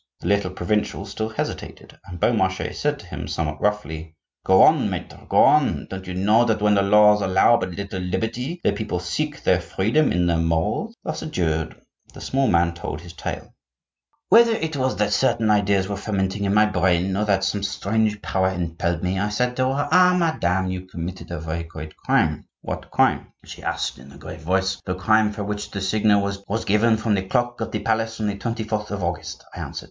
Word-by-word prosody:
The -, -, -4 dB
little 100 Hz, -2 st, +2 dB
provincial 100 Hz, +2 st, -2 dB
still 110 Hz, +2 st, -4 dB
hesitated, 110 Hz, -, -6 dB
and 90 Hz, -2 st, -8 dB
Beaumarchais 95 Hz, -4 st, +1 dB
said -, -, -1 dB
to -, -, -15 dB
him -, -, -6 dB
somewhat 75 Hz, -2 st, -3 dB
roughly:— 80 Hz, -6 st, -2 dB, 0.3 s
"Go 95 Hz, 0 st, +6 dB
on, -, -, +4 dB
maitre, -, -, -7 dB
go -, -, +1 dB
on! -, -, +3 dB
Don't 95 Hz, -1 st, -6 dB
you 90 Hz, -, -5 dB
know 105 Hz, +5 st, +4 dB
that 110 Hz, -2 st, +1 dB
when 105 Hz, 0 st, +3 dB
the 100 Hz, -, +4 dB
laws 105 Hz, +1 st, +5 dB
allow 95 Hz, +5 st, +4 dB
but 95 Hz, -, -3 dB
little 100 Hz, -1 st, -5 dB
liberty 115 Hz, -, -3 dB
the -, -, +3 dB
people 105 Hz, -5 st, -3 dB
seek 85 Hz, -1 st, -3 dB
their -, -, +3 dB
freedom 120 Hz, +10 st, +1 dB
in 90 Hz, 0 st, +1 dB
their 85 Hz, -1 st, +1 dB
morals?" 85 Hz, -, -1 dB
Thus -, -, -4 dB
adjured, 80 Hz, -, -2 dB, 0.4 s
the -, -, -9 dB
small 135 Hz, 0 st, 0 dB
man 85 Hz, 0 st, +2 dB
told 85 Hz, -2 st, -6 dB
his 85 Hz, 0 st, -11 dB
tale:— -, -, -6 dB, 0.8 s
"Whether 230 Hz, 0 st, +6 dB
it 160 Hz, -7 st, -2 dB
was 130 Hz, -1 st, 0 dB
that 105 Hz, 0 st, 0 dB
certain 115 Hz, -4 st, +2 dB
ideas 100 Hz, -2 st, +2 dB
were 100 Hz, -, -3 dB
fermenting 100 Hz, -1 st, -2 dB
in 100 Hz, -, +1 dB
my 105 Hz, 0 st, +6 dB
brain, 95 Hz, -1 st, +1 dB
or 105 Hz, -, +1 dB
that 100 Hz, -2 st, +1 dB
some 100 Hz, +1 st, 0 dB
strange 105 Hz, +2 st, -1 dB
power 95 Hz, -1 st, +1 dB
impelled 85 Hz, -1 st, -2 dB
me, 95 Hz, +1 st, 0 dB
I 100 Hz, +1 st, 0 dB
said 125 Hz, +4 st, -1 dB
to 130 Hz, 0 st, +2 dB
her: 145 Hz, +2 st, -1 dB
'Ah! 180 Hz, +1 st, +6 dB
madame, 95 Hz, -, 0 dB
you 95 Hz, 0 st, -6 dB
committed 90 Hz, +1 st, -7 dB
a 85 Hz, -2 st, -4 dB
very 80 Hz, +1 st, -4 dB
great 80 Hz, -2 st, -9 dB
crime.' -, -, 0 dB, 0.2 s
'What -, -, -5 dB
crime?' -, -, +1 dB
she -, -, -10 dB
asked -, -, -3 dB
in 65 Hz, +2 st, -14 dB
a -, -, -13 dB
grave 80 Hz, -, -9 dB
voice. 95 Hz, +2 st, 0 dB
'The 90 Hz, -, -3 dB
crime 110 Hz, +3 st, +3 dB
for 105 Hz, 0 st, -5 dB
which 105 Hz, 0 st, -4 dB
the 100 Hz, -, -5 dB
signal 100 Hz, +1 st, +2 dB, 0.2 s
was 110 Hz, +3 st, -2 dB
given 110 Hz, +2 st, +3 dB
from 110 Hz, 0 st, 0 dB
the 100 Hz, -, +1 dB
clock 120 Hz, +1 st, -1 dB
of -, -, -2 dB
the -, -, -3 dB
palace 115 Hz, 0 st, -1 dB
on 110 Hz, -, -1 dB
the 100 Hz, -1 st, -1 dB
24th 110 Hz, -1 st, -3 dB
of 100 Hz, -2 st, -4 dB
August,' 85 Hz, +1 st, -4 dB
I -, -, -8 dB
answered. -, -, -5 dB
100 Hz, 205 wpm, -23 LUFS, 90-110 Hz, 0.8 s, Go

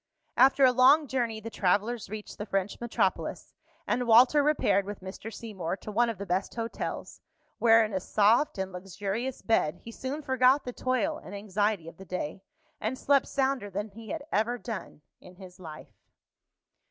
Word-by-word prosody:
After 265 Hz, +2 st, +6 dB
a 255 Hz, -, +6 dB
long 260 Hz, +5 st, +6 dB
journey, 240 Hz, -5 st, -2 dB
the 225 Hz, +1 st, -8 dB
travellers 205 Hz, +3 st, 0 dB
reached 215 Hz, 0 st, -8 dB
the 210 Hz, -, -3 dB
French 195 Hz, 0 st, -2 dB
metropolis; 240 Hz, -1 st, -1 dB, 0.3 s
and 245 Hz, 0 st, -1 dB
Walter 250 Hz, +6 st, +6 dB
repaired 240 Hz, -10 st, +2 dB
with 205 Hz, 0 st, -7 dB
Mr. 190 Hz, +4 st, -8 dB
Seymour 195 Hz, -6 st, -5 dB
to 215 Hz, -, -8 dB
one 235 Hz, +3 st, +2 dB
of 225 Hz, -, -4 dB
the 200 Hz, -, -6 dB
best 190 Hz, +1 st, -2 dB
hotels, 230 Hz, -1 st, -5 dB, 0.4 s
where, 225 Hz, -1 st, +6 dB
in 215 Hz, -, -6 dB
a 190 Hz, -, 0 dB
soft 215 Hz, +8 st, +2 dB
and 190 Hz, 0 st, -3 dB
luxurious 195 Hz, +7 st, -4 dB
bed, 170 Hz, -8 st, +2 dB
he 230 Hz, -, -8 dB
soon 270 Hz, +6 st, -5 dB
forgot 260 Hz, +1 st, +3 dB
the 250 Hz, -, -5 dB
toil 255 Hz, +6 st, -1 dB
and 200 Hz, -, -8 dB
anxiety 205 Hz, -3 st, -1 dB
of 165 Hz, -, -10 dB
the 190 Hz, -, -11 dB
day, 180 Hz, -1 st, -4 dB, 0.4 s
and 230 Hz, +5 st, -2 dB
slept 280 Hz, 0 st, +2 dB
sounder 265 Hz, -6 st, -1 dB
than 205 Hz, +3 st, -4 dB
he 220 Hz, +2 st, -12 dB
had 320 Hz, -3 st, -4 dB
ever 230 Hz, +3 st, +1 dB
done 225 Hz, -, -7 dB, 0.2 s
in 180 Hz, -, -15 dB
his 185 Hz, -1 st, -13 dB
life. 155 Hz, -4 st, -10 dB
220 Hz, 175 wpm, -28 LUFS, 195-250 Hz, 0.4 s, After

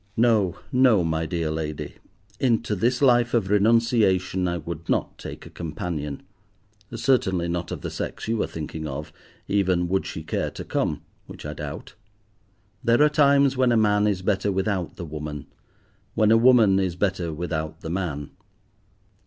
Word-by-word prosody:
No, 110 Hz, -6 st, +3 dB
no, 125 Hz, -7 st, +4 dB
my 80 Hz, 0 st, -1 dB
dear 85 Hz, -3 st, -2 dB
lady, 75 Hz, -1 st, -5 dB, 0.4 s
into 115 Hz, -4 st, +1 dB
this 120 Hz, +7 st, +1 dB
life 120 Hz, -2 st, +4 dB
of 100 Hz, -4 st, 0 dB
renunciation 105 Hz, -4 st, +3 dB
I 85 Hz, 0 st, -1 dB
would 85 Hz, 0 st, -7 dB
not -, -, 0 dB
take -, -, -8 dB
a -, -, -12 dB
companion, 75 Hz, -3 st, -5 dB, 0.7 s
certainly 95 Hz, -8 st, +1 dB
not 85 Hz, 0 st, -3 dB
of -, -, -5 dB
the -, -, -5 dB
sex -, -, -5 dB
you 115 Hz, -1 st, 0 dB
are -, -, 0 dB
thinking 80 Hz, 0 st, -6 dB
of, 75 Hz, +2 st, -6 dB, 0.3 s
even 95 Hz, -3 st, +1 dB
would 95 Hz, +1 st, 0 dB
she 80 Hz, -, -6 dB
care -, -, -2 dB
to -, -, -8 dB
come, -, -, -1 dB, 0.2 s
which -, -, -10 dB
I 75 Hz, -, -4 dB
doubt. 75 Hz, -2 st, -7 dB, 0.9 s
There 120 Hz, +5 st, +4 dB
are 150 Hz, -, +5 dB
times 140 Hz, -2 st, +4 dB
when 130 Hz, -1 st, +3 dB
a 120 Hz, -, +3 dB
man 105 Hz, -1 st, +3 dB
is 95 Hz, -3 st, -1 dB
better 100 Hz, 0 st, +1 dB
without 95 Hz, -2 st, -1 dB
the 85 Hz, -, -6 dB
woman, 75 Hz, -2 st, -6 dB, 0.7 s
when 110 Hz, -1 st, +4 dB
a -, -, +7 dB
woman 115 Hz, -5 st, +5 dB
is 95 Hz, -3 st, -1 dB
better 90 Hz, -3 st, -1 dB
without 80 Hz, -1 st, -4 dB
the 80 Hz, -, -5 dB
man. 80 Hz, -6 st, -3 dB
95 Hz, 165 wpm, -24 LUFS, 80-115 Hz, 0.9 s, a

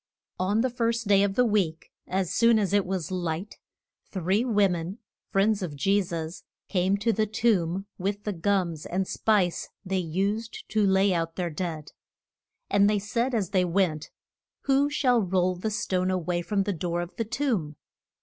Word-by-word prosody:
ON 200 Hz, +4 st, +2 dB
the 260 Hz, -, +1 dB
first 230 Hz, -2 st, -1 dB
day 200 Hz, -1 st, +5 dB
of 200 Hz, -1 st, +1 dB
the 250 Hz, -, +4 dB
week, 190 Hz, -8 st, 0 dB, 0.2 s
as 185 Hz, -2 st, -1 dB
soon 230 Hz, -1 st, +5 dB
as 200 Hz, -2 st, 0 dB
it 205 Hz, -2 st, +2 dB
was 185 Hz, -3 st, -3 dB
light, 175 Hz, +1 st, -3 dB, 0.5 s
three 190 Hz, +4 st, 0 dB
wo 210 Hz, -5 st, +3 dB
men, 175 Hz, +2 st, -3 dB, 0.3 s
friends 200 Hz, +1 st, +2 dB
of 165 Hz, -6 st, -4 dB
Je 195 Hz, +8 st, +2 dB
sus, 170 Hz, -2 st, -5 dB, 0.2 s
came 190 Hz, +1 st, +1 dB
to 225 Hz, +3 st, +1 dB
the 215 Hz, 0 st, +1 dB
tomb 195 Hz, -4 st, +1 dB
with 200 Hz, +2 st, -2 dB
the 210 Hz, -, -2 dB
gums 175 Hz, -3 st, -1 dB
and 185 Hz, +1 st, -1 dB
spice 200 Hz, -6 st, +1 dB, 0.2 s
they 190 Hz, 0 st, 0 dB
used 200 Hz, +7 st, -2 dB
to 215 Hz, -1 st, +2 dB
lay 190 Hz, 0 st, +3 dB
out 165 Hz, -1 st, -2 dB
their 175 Hz, -2 st, -2 dB
dead. 155 Hz, -2 st, -4 dB, 0.8 s
And 200 Hz, 0 st, +4 dB
they 210 Hz, -, +2 dB
said 235 Hz, +5 st, -1 dB
as 200 Hz, -6 st, -1 dB
they 185 Hz, -2 st, +3 dB
went, 170 Hz, -4 st, 0 dB, 0.5 s
Who 275 Hz, +1 st, +2 dB
shall 250 Hz, -5 st, +2 dB
roll 185 Hz, -1 st, +1 dB
the 185 Hz, +5 st, -3 dB
stone 185 Hz, -3 st, -1 dB
a 185 Hz, -, +1 dB
way 175 Hz, 0 st, -1 dB
from 200 Hz, +2 st, 0 dB
the 205 Hz, 0 st, -1 dB
door 175 Hz, +1 st, -2 dB
of 175 Hz, +1 st, -7 dB
the 230 Hz, -, 0 dB
tomb? 220 Hz, -, -1 dB
195 Hz, 180 wpm, -27 LUFS, 175-210 Hz, 0.8 s, day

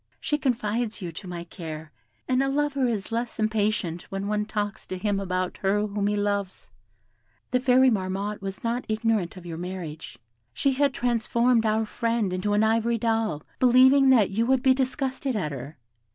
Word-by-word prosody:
She 295 Hz, -, -1 dB
confides 230 Hz, -3 st, -1 dB
you 175 Hz, -, -4 dB
to 185 Hz, +4 st, -9 dB
my 175 Hz, -1 st, -5 dB
care, 160 Hz, -3 st, -8 dB, 0.4 s
and 255 Hz, 0 st, +2 dB
a 270 Hz, -, +1 dB
lover 280 Hz, -2 st, +1 dB
is 220 Hz, -2 st, -3 dB
less 235 Hz, +1 st, -2 dB
impatient 210 Hz, -6 st, 0 dB
when 195 Hz, 0 st, -4 dB
one 210 Hz, 0 st, 0 dB
talks 205 Hz, -1 st, -4 dB
to 185 Hz, -, -4 dB
him 205 Hz, +1 st, 0 dB
about 185 Hz, -1 st, -2 dB
her 205 Hz, +2 st, +1 dB
whom 205 Hz, -1 st, -1 dB
he 210 Hz, -, +1 dB
loves. 200 Hz, -, -2 dB, 0.8 s
The 250 Hz, -, +3 dB
fairy 255 Hz, 0 st, +5 dB
Marmotte 195 Hz, 0 st, -2 dB
was 195 Hz, 0 st, -6 dB
not 235 Hz, +2 st, -1 dB
ignorant 215 Hz, -5 st, 0 dB
of 180 Hz, -, -11 dB
your 165 Hz, -1 st, -6 dB
marriage; 175 Hz, -4 st, -6 dB, 0.4 s
she 275 Hz, -, +2 dB
had 280 Hz, +1 st, +2 dB
transformed 235 Hz, 0 st, +2 dB
our 220 Hz, +1 st, +1 dB
friend 230 Hz, -3 st, -1 dB
into 195 Hz, +3 st, -1 dB
an 210 Hz, +1 st, +3 dB
ivory 230 Hz, +1 st, +2 dB
doll, 225 Hz, -9 st, 0 dB, 0.2 s
believing 260 Hz, +2 st, +6 dB
that 225 Hz, -7 st, +5 dB
you 225 Hz, +4 st, 0 dB
would 265 Hz, -1 st, +2 dB
be 265 Hz, -1 st, +6 dB
disgusted 265 Hz, 0 st, -2 dB
at 180 Hz, -8 st, -1 dB
her. 140 Hz, +3 st, -7 dB
215 Hz, 180 wpm, -26 LUFS, 190-245 Hz, 0.8 s, believing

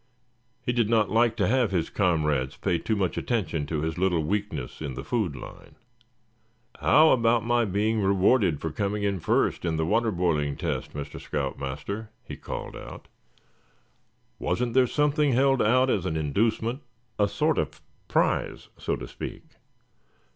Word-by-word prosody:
He 125 Hz, -, +1 dB
did 120 Hz, -3 st, +1 dB
not 110 Hz, -4 st, +2 dB
like 115 Hz, 0 st, +3 dB
to 105 Hz, -, +1 dB
have 125 Hz, -1 st, +2 dB
his 90 Hz, -4 st, -1 dB
comrades 75 Hz, -8 st, +1 dB
pay 90 Hz, -4 st, 0 dB
too 110 Hz, -, -1 dB
much 95 Hz, -3 st, -1 dB
attention 90 Hz, -, -1 dB
to 75 Hz, -1 st, -2 dB
his 80 Hz, +2 st, -3 dB
little 90 Hz, -4 st, +2 dB
weakness 100 Hz, -8 st, -3 dB
in 70 Hz, -4 st, -4 dB
the -, -, -6 dB
food 105 Hz, -, -1 dB
line. -, -, -11 dB, 1.0 s
"How 155 Hz, +1 st, +6 dB
about 115 Hz, -2 st, +3 dB
my 120 Hz, 0 st, +2 dB
being 105 Hz, +3 st, 0 dB
rewarded 95 Hz, -, +3 dB
for 80 Hz, -, -3 dB
coming 100 Hz, +5 st, -2 dB
in 100 Hz, -2 st, 0 dB
first -, -, +1 dB
in 85 Hz, -2 st, 0 dB
the 80 Hz, 0 st, 0 dB
water 115 Hz, +7 st, +2 dB
boiling 85 Hz, -7 st, 0 dB
test, -, -, -3 dB
Mr. 70 Hz, -1 st, -6 dB
Scout 70 Hz, -2 st, -3 dB
Master?" 100 Hz, +11 st, -5 dB
he -, -, -8 dB
called -, -, -6 dB
out. -, -, -10 dB, 1.3 s
"Wasn't 120 Hz, -1 st, -1 dB
there 130 Hz, 0 st, +4 dB
something 150 Hz, 0 st, +2 dB
held 135 Hz, +1 st, +3 dB
out 130 Hz, +4 st, +3 dB
as 95 Hz, -3 st, 0 dB
an 80 Hz, -, -1 dB
inducement, 110 Hz, -, 0 dB, 0.4 s
a 105 Hz, -, +4 dB
sort -, -, +1 dB
of -, -, -3 dB, 0.3 s
prize, -, -, 0 dB
so -, -, -1 dB
to -, -, -7 dB
speak? -, -, -7 dB
100 Hz, 160 wpm, -26 LUFS, 80-115 Hz, 1.3 s, How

